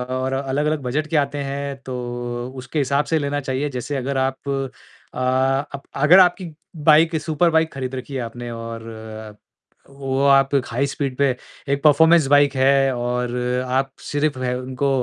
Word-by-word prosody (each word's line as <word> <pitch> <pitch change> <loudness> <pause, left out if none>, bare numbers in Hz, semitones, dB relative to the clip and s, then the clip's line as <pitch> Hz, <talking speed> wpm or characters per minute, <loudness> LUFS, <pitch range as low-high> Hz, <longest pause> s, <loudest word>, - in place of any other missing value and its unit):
और 130 +1 -1
अलग-अलग 140 +3 -1
बजट 145 +5 -2
के 155 - 0
आते 145 0 0
हैं 140 0 -4
तो, 120 -1 -5
उसके 130 +4 -4
हिसाब 140 +1 +1
से 160 - +1
लेना 145 0 -1
चाहिए 135 +1 -2
जैसे 130 +2 -4
अगर 135 +1 -2
आप 130 +1 -2 0.6
अ, - - -6
अप 135 +2 0 0.4
आपकी 180 -2 +3 0.4
बाइक 160 +2 +5
सुपर 160 +2 +1
बाइक 160 -1 +1
खरीद 130 -1 -4
रखी 130 +2 -7
है 130 - -2
आपने 120 +1 -6
और 115 0 -7 1.0
वो 135 -1 -3
आप 135 -1 +5 0.2
हाई 125 +4 -1
स्पीड 135 -2 -3
पर 140 -3 +2 0.4
एक 140 0 0
परफॉर्मेंस 160 +2 +6
बाइक 145 0 +4
है 135 0 +3
और 120 0 -2 0.3
आप 130 +1 0
सिर्फ 145 -2 -1
उनको 130 +2 -2
135 Hz, 155 wpm, -21 LUFS, 130-145 Hz, 1.0 s, परफॉर्मेंस